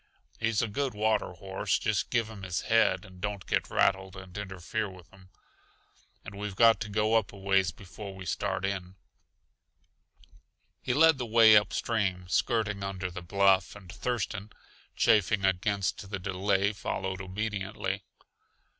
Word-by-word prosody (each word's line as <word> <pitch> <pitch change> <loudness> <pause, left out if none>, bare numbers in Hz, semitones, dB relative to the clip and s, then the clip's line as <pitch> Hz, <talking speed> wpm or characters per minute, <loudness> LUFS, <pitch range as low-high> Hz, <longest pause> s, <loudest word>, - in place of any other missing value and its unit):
He's 115 -1 +1
a - - 0
good 130 +2 -2
water 110 -3 +1
horse, 95 +2 -2
just 110 -2 -1
give 115 -3 +1
him 110 -3 -10
his 90 -2 -2
head 115 -1 +2
and 95 -2 -14
don't 105 -2 -3
get - - -1
rattled 95 -1 +1
and 95 -1 -11
interfere 100 +1 -4
with 90 -2 -14
him. 95 -1 -18 1.0
And 100 - -8
we've 100 -1 -5
got 115 -1 +6
to 110 - -5
go 105 +2 +1
up 110 -3 +2
a 100 - -12
ways 95 -2 +2
before 100 +3 -10
we 95 -1 -9
start 95 - -2
in." 95 -2 -4 1.9
He 125 - -1
led 160 -1 +6
the 125 - -3
way 110 -1 +7
upstream, 105 -3 +1
skirting 105 -1 0
under 95 -2 -4
the 90 - -7
bluff, 95 +2 +2
and 95 -4 -11
Thurston, 110 -4 -3 0.5
chafing 105 -1 +3
against 95 +1 0
the 100 - -3
delay, 95 +2 0
followed 95 -2 -3
obediently. 100 0 -3
100 Hz, 150 wpm, -29 LUFS, 95-110 Hz, 1.9 s, way